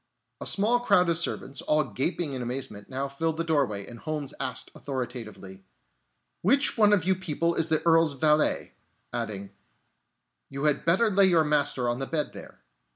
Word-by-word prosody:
A - - -4
small 220 +5 +2
crowd 200 -7 +3
of 165 - +2
servants, 140 -5 -3
all 150 0 +2
gaping 140 - -2
in 130 - -4
amazement, 120 -5 -5
now 135 +1 -2
filled 160 +3 -2
the 165 - 0
doorway, 135 -12 0
and 120 -1 -11
Holmes 150 -2 -4
asked 130 -3 -3
authoritatively: 115 -8 -6 0.8
"Which 275 - +2
one 210 -2 +5
of 200 -5 +3
you 190 - +3
people 170 -2 -1
is 165 0 +1
the 155 +1 0
Earl's 165 -2 +4
valet?" 150 +2 +1 0.4
Adding: 105 -4 -4 1.0
"You 140 +1 -6
had 150 -2 +1
better 195 +7 +3
lay 195 0 +5
your 170 -3 +4
master 145 -4 +1
on 120 +1 -1
the 135 - -3
bed 155 -3 -2
there." - - -11
150 Hz, 170 wpm, -27 LUFS, 130-170 Hz, 1.0 s, one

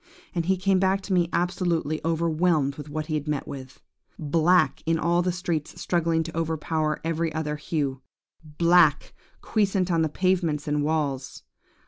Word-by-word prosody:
And 170 -1 -2
he 190 0 +2
came 190 0 +2
back 190 +1 +2
to 195 - -3
me 175 -2 +2
absolutely 170 -3 0
overwhelmed 165 -2 +1
with 150 0 -9
what 155 +1 -3
he 155 - -5
had 150 0 -2
met 150 -2 -2
with. 130 -2 -9 0.4
Black 165 +4 +2
in 165 0 +2
all 170 +2 +2
the 180 +1 0
streets 170 -4 -3
struggling 165 -2 +1
to 165 0 -8
overpower 160 -1 -1
every 165 0 -1
other 150 -1 -2
hue. 145 -3 -3 0.4
Black 165 0 +3 0.3
quiescent 195 -4 +1
on 165 -1 +2
the 160 - +1
pavements 170 -3 0
and 150 0 0
walls. 145 -4 -2
165 Hz, 160 wpm, -25 LUFS, 150-175 Hz, 0.4 s, Black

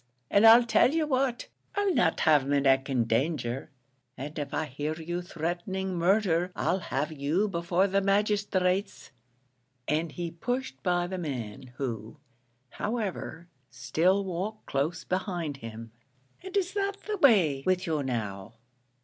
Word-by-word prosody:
And 205 +3 +6
I'll 230 +2 +9
tell 240 +2 +4
you 320 -1 +2
what, 260 -3 0 0.3
I'll 405 -2 +2
not 170 - +2
have 150 -4 +4
my 145 0 +2
neck 135 0 +3
in 125 -3 +2
danger; 120 +2 -1 0.5
and 145 +4 -6
if 145 -1 -4
I 160 - -1
hear 150 +3 -4
you 175 +2 -4
threatening 180 +3 -3
murdher, 180 0 +2
I'll 185 - 0
have 150 -3 -2
you 155 +8 0
before 175 0 +1
the 195 0 +1
magisthrates," 200 -3 0 0.8
and 155 +2 0
he 170 +2 -4
pushed 250 +10 -3
by 175 -1 +1
the 185 +1 -4
man, 130 -4 -5
who, 115 -1 -4 0.5
however, 195 - -4 0.2
still 175 +10 +1
walked 190 +4 -4
close 150 +5 -1
behind 180 -6 -2
him. 115 -2 -9 0.5
"And 380 +1 -4
is 380 -1 0
that 400 0 -2
the 425 -1 -2
way 190 - +4
with 185 0 +2
you 155 -3 0
now? 110 -5 -4
175 Hz, 145 wpm, -28 LUFS, 140-200 Hz, 0.8 s, I'll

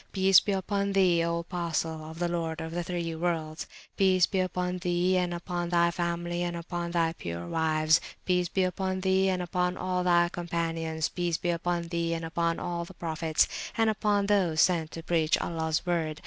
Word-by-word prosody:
Peace 190 -1 +6
be 205 - -3
upon 200 +1 -1
Thee, 180 -3 +4
O 170 0 0
Apostle 165 -2 -3
of 160 - -9
the 175 0 0
Lord 165 -2 -2
of 160 0 -5
the 175 +1 -2
(three) 170 -1 -3
Worlds! 160 -1 -2 0.3
Peace 185 -2 +4
be 190 - -2
upon 180 0 -1
Thee, 180 +1 +1
and 180 -1 +1
upon 175 0 -3
Thy 170 0 +3
Family, 175 0 -2
and 175 -1 -2
upon 170 0 -4
Thy 165 -1 +1
pure 85 - -6
Wives! 155 - +2 0.2
Peace 180 -1 +1
be 190 -1 +1
upon 185 +1 -1
Thee, 190 0 +3
and 180 -1 0
upon 180 +1 -1
all 180 0 -1
Thy 175 -1 +4
Companions! 165 -2 -2
Peace 175 -2 -1
be 175 - -1
upon 170 0 -2
Thee, 170 -1 -1
and 165 0 -4
upon 165 0 0
all 170 -1 -3
the 175 +2 -12
Prophets, 160 -2 +1 0.3
and 225 -1 +3
upon 205 -1 +1
those 190 -6 +2
sent 170 -4 +2
to 165 +1 -8
preach 160 -2 +2
Allah's 160 -1 -2
Word! 165 -3 -1
175 Hz, 190 wpm, -28 LUFS, 165-180 Hz, 0.3 s, Peace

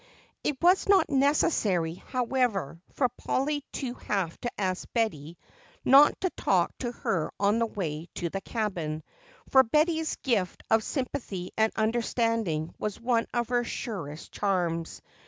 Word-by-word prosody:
It 290 - 0
was 365 +3 +4
not 395 -5 +5
necessary, 265 - +2
however, 235 - -1
for 260 - +2
Polly 275 +4 -2
to 255 -4 -3
have 195 -8 -2
to 240 - -1
ask 185 -2 -2
Betty 170 -8 -1 0.5
not 280 +3 +7
to 370 -2 0
talk - - +1
to 240 -2 -2
her 170 -8 -2
on 205 +3 +3
their 230 - +2
way 165 -6 -4
to 170 -2 -3
the 195 - -3
cabin, 175 -9 -3 0.5
for 265 - +7
Betty's 315 +5 +1
gift 200 -9 0
of 220 0 +4
sympathy 235 - -4
and 220 0 +3
understanding 225 -7 0
was 210 -2 -3
one 235 -1 +1
of 240 -1 -1
her 245 -1 +2
surest 170 -11 -5
charms. 175 -5 -1
225 Hz, 140 wpm, -28 LUFS, 180-255 Hz, 0.5 s, not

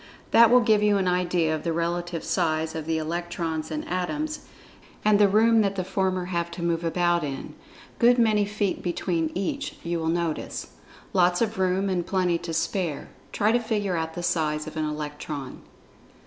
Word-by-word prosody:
That 230 -1 +7
will 250 +1 +6
give 215 -3 +3
you 210 -1 +3
an 190 -2 0
idea 180 -3 +1
of 155 - -5
the 170 - -1
relative 170 0 -2
size 160 -3 0
of 160 -1 -5
the 160 0 +1
Electrons 165 -1 -3
and 155 -1 -4
Atoms, 295 - -2 0.7
and 210 -1 +5
the 205 - +6
room 225 +3 +4
that 200 -1 0
the 185 - -1
former 185 -1 -1
have 170 -1 -2
to 170 - -4
move 170 0 0
about 175 0 +1
in—good 235 - -1
many 215 -3 +3
feet 205 -1 -2
between 170 -2 -1
each, 280 +10 -3
you 170 0 -2
will 160 - -2
notice. 170 -2 -2 0.4
Lots 180 -1 +3
of 220 -3 -1
room, 190 +1 +1
and 185 -2 0
plenty 180 -2 0
to 170 - -6
spare. 165 -2 -2 0.2
Try 210 +1 +2
to 240 - +3
figure 210 -5 -1
out 160 0 -3
the 175 - -4
size 155 -3 0
of 155 - -8
an 155 -1 -1
Electron. 150 -2 -5
175 Hz, 180 wpm, -25 LUFS, 165-200 Hz, 0.7 s, That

